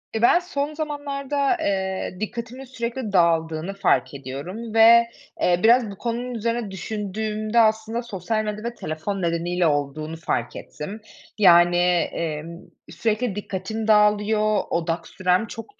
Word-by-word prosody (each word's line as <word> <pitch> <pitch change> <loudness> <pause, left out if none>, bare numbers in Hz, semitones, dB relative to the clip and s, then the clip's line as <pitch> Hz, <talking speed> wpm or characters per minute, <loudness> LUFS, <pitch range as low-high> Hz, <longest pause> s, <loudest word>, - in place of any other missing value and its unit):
E, 220 - -1
ben 240 - +6
son 300 -4 -3
zamanlarda, 290 0 -2
eee, 190 -5 -2
dikkatimin 235 +4 -5
sürekli 235 -3 -5
dağıldığını 165 0 +2
fark 195 - +1
ediyorum 145 - -7
ve, 230 +1 +7 0.4
eee, 175 0 +3
biraz 230 -1 +5
bu 195 - -10
konunun 240 +2 -3
üzerine 230 -1 -2
düşündüğümde 215 +3 -2
aslında 220 +1 +2
sosyal 215 0 -2
medya 210 0 -4
ve 235 0 -3
telefon 155 +5 -4
nedeniyle 170 +1 0
olduğunu 150 +2 -2
fark 155 -7 -2
ettim. 200 +8 -8 0.4
Yani, 175 -3 +6
emm, 170 -2 -1 0.3
sürekli 220 -1 -1
dikkatim 205 +2 -4
dağılıyor, 210 0 +3
odak 165 0 -2
sürem 185 +4 0
çok 315 - -10
210 Hz, 130 wpm, -23 LUFS, 175-230 Hz, 0.4 s, ve